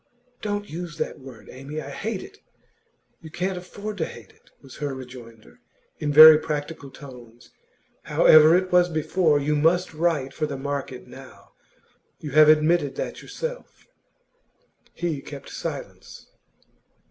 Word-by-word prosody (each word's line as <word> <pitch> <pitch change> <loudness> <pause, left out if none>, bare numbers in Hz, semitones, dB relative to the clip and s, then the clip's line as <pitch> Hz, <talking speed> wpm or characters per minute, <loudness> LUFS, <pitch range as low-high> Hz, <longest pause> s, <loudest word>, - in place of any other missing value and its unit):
'Don't 205 -1 -3
use 170 -2 -7
that - - -4
word, 130 -5 -13
Amy. 135 +4 -7
I 140 -2 -8
hate 205 +5 -4
it!' 415 - -14 0.8
'You 160 - -11
can't 185 +4 -3
afford 200 +3 -8
to 160 - -1
hate - - -13
it,' - - -28
was 135 -2 -14
her 145 -2 -4
rejoinder, 120 - -13 0.4
in 150 - -2
very 155 +1 +10
practical 150 -2 -5
tones. 120 -4 -14 0.5
'However 155 +2 +6
it 185 0 -3
was 180 0 +4
before, 160 -1 +1
you 150 +2 0
must 165 +4 +1
write 155 -4 -1
for 155 - -2
the 140 -2 -5
market 135 -2 -5
now. - - -15 0.7
You 150 - -7
have 155 +2 +6
admitted 155 -2 +3
that - - -5
yourself.' - - -8 1.1
He 165 -5 -3
kept 140 -1 -10
silence. - - -8
155 Hz, 140 wpm, -24 LUFS, 140-175 Hz, 1.1 s, very